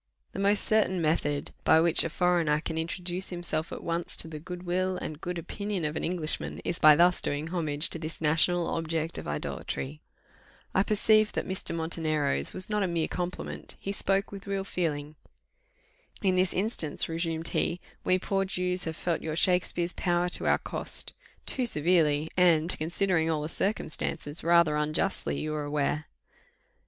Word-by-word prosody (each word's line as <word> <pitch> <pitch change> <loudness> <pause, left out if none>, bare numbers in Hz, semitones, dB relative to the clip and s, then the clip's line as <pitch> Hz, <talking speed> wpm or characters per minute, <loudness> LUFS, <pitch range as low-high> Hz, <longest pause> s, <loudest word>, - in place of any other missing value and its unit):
The - - -6
most 200 +1 +2
certain 215 -4 +2
method 155 -3 0
by 160 - +6
which 165 0 +6
a 165 - -1
foreigner 170 -3 +2
an 160 - -3
introduce 175 +2 -4
himself 175 -2 -3
at - - -7
once 170 +1 -1
to - - -1
the 155 -1 -7
good 180 +3 -8
will 185 +1 0
and 155 -3 -6
good 175 0 -4
opinion 200 +1 -3
of 150 +1 -2
an - - -3
Englishman, 165 -2 -1
is 175 - -2
by 155 -1 +8
thus 175 +3 +4
doing 145 +3 -2
homage 155 -3 0
to 165 - -4
this 160 0 -6
national 165 +3 +2
object 165 0 -2
of - - -8
idolatry. 70 -1 -4 0.7
I 190 - +4
perceived 215 +1 +3
that - - -2
Mr. 185 -2 0
Montenero's 155 - +1
was 185 +1 -4
not 210 -1 0
a 195 - +1
mere 170 -2 0
compliment 180 0 -5
he 195 - -4
spoke 195 0 0
with 200 0 -9
real 195 -1 -1
feeling. 155 -5 -3 1.1
"In 190 -2 +3
this 185 -1 +3
instance," 185 -6 +1
resumed 165 0 -2
he, 175 - 0 0.2
"we 185 - +3
poor 195 +1 0
Jews 180 -1 0
have 160 -1 -3
felt 170 -2 -1
your 155 -1 -3
Shakspeare's 175 -1 +2
power 175 0 0
to - - 0
our - - +4
cost - - -1 0.3
too 255 -2 -1
severely, 155 -4 +2
and, 170 -2 +3
considering 165 +1 +1
all 155 -2 0
the 155 - -4
circumstances, 165 -5 -1
rather 170 -2 +4
unjustly, 155 +6 0
you 155 0 -3
are 150 -1 -3
aware." 145 +1 -1
170 Hz, 170 wpm, -28 LUFS, 155-185 Hz, 1.1 s, by